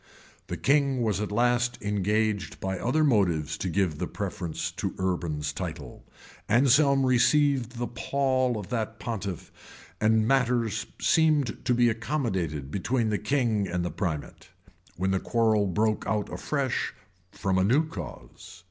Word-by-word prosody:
[] - - -28
The - - -4
king 140 -3 +2
was 105 -2 0
at 105 - -3
last 120 +2 +2
engaged 105 0 -1
by 95 -1 -3
other 145 +6 +1
motives 95 - +2
to 95 - -2
give 85 -3 0
the 90 - -2
preference 90 -4 -4
to - - -4
Urban's 85 -6 -2
title; - - -6 0.5
Anselm 135 +3 +4
received 130 0 +3
the 120 - -1
pall 130 0 0
from - - -13
that 110 -2 -2
pontiff; 100 -6 -5 0.5
and 110 0 +3
matters 120 -4 +1
seemed 155 -5 +2
to 125 - +2
be 120 0 +4
accommodated 110 - -2
between 115 +6 0
the 105 - 0
king 115 -8 0
and 90 0 -2
the 85 - -2
primate,[] 85 -7 -4 0.5
when 95 +2 0
the 95 - +1
quarrel 110 -3 +2
broke 110 +3 0
out 105 0 -1
afresh 140 -4 -2 0.4
from 95 -1 0
a - - +3
new 135 +11 +3
cause. 95 - -9
110 Hz, 150 wpm, -27 LUFS, 95-125 Hz, 0.5 s, Anselm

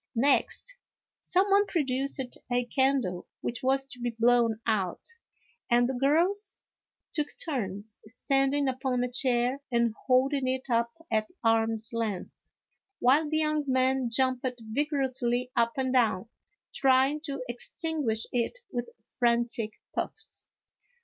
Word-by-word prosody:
Next, 285 - +1 0.4
some 375 +2 +2
one 400 +1 +5
produced 275 -4 -1 0.3
a 245 0 +2
candle 265 -9 0
which 235 - -4
was 270 +1 +2
to 250 -2 -11
be 240 0 -1
blown 230 -1 +3
out, 200 -6 0 0.7
and 240 0 +4
the 265 - -2
girls 345 +10 +1 0.5
took 300 -2 0
turns 210 - -3
standing 275 +4 +1
upon 260 -1 0
a 250 - -2
chair 250 +1 +1
and 235 -2 +2
holding 265 +1 +3
it 260 0 -1
up 235 0 +2 0.2
at 215 -1 +1 0.2
arms 225 -1 +2
length, 220 -5 -2 0.7
while 290 +5 +3
the 310 - +1
young 305 -1 +1
men 260 -1 +2
jumped 255 +1 +1 0.3
vigorously 255 -3 0
up 235 -1 +2
and 260 -1 0
down, 230 -5 +2 0.5
try 265 0 +4
ing 300 +1 -4
to 275 -4 -4
extinguish 240 -1 -2
it 245 - -1
with 240 -1 -3 0.3
frantic 235 -2 +1 0.2
puffs. - - -5
255 Hz, 130 wpm, -28 LUFS, 235-275 Hz, 0.7 s, one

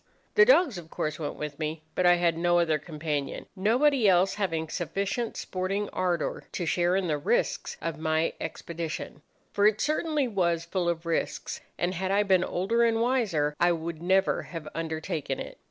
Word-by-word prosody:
The 445 - +7
dogs, 350 - +4
of 165 -2 -12
course, 155 0 -3
went 150 - -3
with 150 -1 -6
me, 155 0 -3
but 180 - +2
I 175 - +7
had 170 -1 +2
no 175 +1 +2
other 160 -3 +2
companion, 150 -2 -4
nobody 235 +4 +3
else 185 +1 +4
having 165 -6 -1
sufficient 195 +7 -2
sporting 195 +3 -2
ardour 175 -3 -1
to 175 - -2
share 175 +2 +2
in 195 -1 +1
the 150 -2 0
risks 210 +11 0
of 165 -1 -3
my 160 0 +1
expedition; 165 -3 -5 0.3
for 205 0 +4
it 215 0 +2
certainly 305 -2 +1
was 170 -6 0
full 175 0 -1
of 170 0 -2
risks, 165 -1 -2 0.2
and 175 +1 0
had 185 +1 -2
I 200 +2 +3
been 190 -3 +3
older 205 +7 +1
and 225 -1 +3
wiser 215 - +1
I 175 0 +4
would 165 -1 -5
never 190 +2 +2
have 165 -3 -8
undertaken 160 -3 -3
it. - - -8
175 Hz, 180 wpm, -28 LUFS, 160-200 Hz, 0.3 s, The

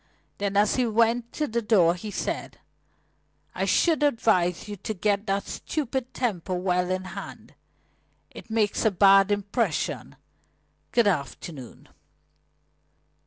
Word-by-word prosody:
Then 200 0 -1
as 205 +4 +3
he 250 -2 +2
went 230 +1 +1
to 305 - -1
the 235 -4 -2
door 195 -7 +4
he 180 +4 -7
said: - - -4 1.0
"I - - -1
should 325 -3 +2
advise 215 - +1
you 205 - -5
to 215 +4 -5
get 200 +2 0
that 195 0 0
stupid 265 -4 -4
temper 195 -7 -2
well 180 0 0
in 185 0 -1
hand. 185 - -9 0.8
It - - -12
makes 220 -2 +1
a 220 - +5
bad 195 0 +5
impression. 205 -3 -1 0.8
Good 235 - +3
afternoon." 140 - -4
205 Hz, 125 wpm, -26 LUFS, 185-230 Hz, 1.0 s, a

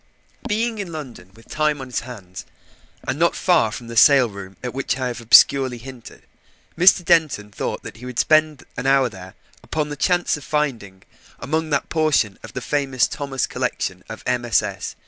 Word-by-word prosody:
Being 225 0 -1
in 190 -4 -5
London, 130 - -9
with 115 - -19
time 155 -1 0
on 130 - -6
his 125 -2 -3
hands, 100 -7 -10 0.6
and 130 +3 -2
not 170 +1 +3
far 160 -12 +2
from 115 +2 -7
the 115 0 -8
sale 135 +2 +6
room 100 -1 -10
at 125 - -4
which 135 -1 -2
I 130 - -2
have 120 -1 -6
obscurely 130 +2 +5
hinted, 125 0 -12 0.5
Mr. 180 0 +5
Denton 155 -12 +2
thought - - -4
that - - -9
he 125 +3 -10
would 125 -2 -8
spend 155 -2 +2
an 125 +2 -2
hour 135 -2 +4
there 95 -3 -12 0.3
upon 150 -1 -3
the 145 - -5
chance 175 +4 +1
of 145 - -11
finding, 125 -11 -3 0.3
among 160 +2 -2
that 140 -2 -1
portion 155 -11 +1
of 115 - -11
the 125 - -4
famous 135 -3 0
Thomas 140 -4 -3
collection - - -3
of - - -8
MSS. 120 -3 -1
135 Hz, 185 wpm, -21 LUFS, 115-155 Hz, 0.6 s, sale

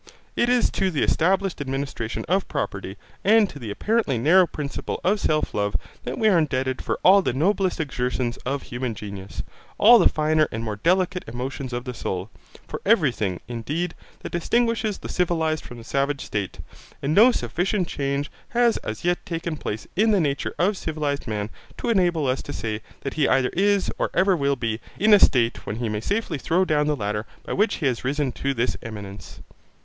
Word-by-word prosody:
It 240 - +2
is 245 -1 +3
to 190 - +1
the 155 -6 0
established 190 +1 +1
administration 135 -4 -3
of 190 +2 +1
property 100 - -4 0.3
and 215 +1 +5
to 145 - -10
the 115 -4 -6
apparently 205 - 0
narrow 170 +9 +5
principle 145 -2 -4
of 205 +3 +2
self 155 -5 0
love 100 0 0 0.3
that - - -3
we 220 - +3
are 190 -5 +5
indebted 130 -4 -1
for - - -2
all 195 +2 +7
the 155 - -1
noblest 185 +6 +1
exertions 125 -4 -2
of 135 +2 -3
human 120 -2 -4
genius, 100 -2 -7 0.3
all 235 +2 +8
the 180 - +6
finer 155 0 +2
and 110 +1 -4
more 105 -2 -3
delicate 180 - +1
emotions 130 +3 -5
of 120 0 -3
the 125 - -4
soul, 95 -2 -4 0.4
for - - -6
everything, 125 - +2
indeed, 150 +9 -3 0.3
that - - -7
distinguishes 225 +3 +1
the - - -8
civilized 160 -3 0
from 120 - -10
the 115 - -10
savage 140 +3 -1
state; 100 -3 -4 0.4
and 140 +2 +1
no 225 +8 +7
sufficient 185 -4 -1
change 140 0 -2 0.2
has 240 -1 +3
as 110 +8 -6
yet 175 0 +1
taken 165 -1 -3
place 110 -7 -5
in 215 +4 +3
the 205 -2 +4
nature 145 -4 -1
of 190 +3 +2
civilized 150 -5 -2
man 105 -2 -2 0.3
to - - -2
enable 175 -8 +2
us 130 0 0
to - - -8
say 110 -1 -3 0.2
that 135 - -4
he 150 - +2
either 130 -1 +2
is, 200 +1 +2
or - - +1
ever 190 0 +4
will 140 -3 +1
be, 115 -3 -2 0.2
in 215 +2 +5
a 205 - +9
state 120 -8 +3
when 105 - -2
he 120 +1 -2
may 105 0 -2
safely 200 - -1
throw 180 +7 +2
down 150 -3 +2
the 150 - +2
ladder 105 -2 -3 0.2
by - - -3
which 210 +3 +2
he 160 - -3
has 125 -4 0
risen 140 0 0
to 135 +2 -2
this 120 +1 0
eminence. 100 -4 -9
145 Hz, 195 wpm, -24 LUFS, 120-185 Hz, 0.4 s, a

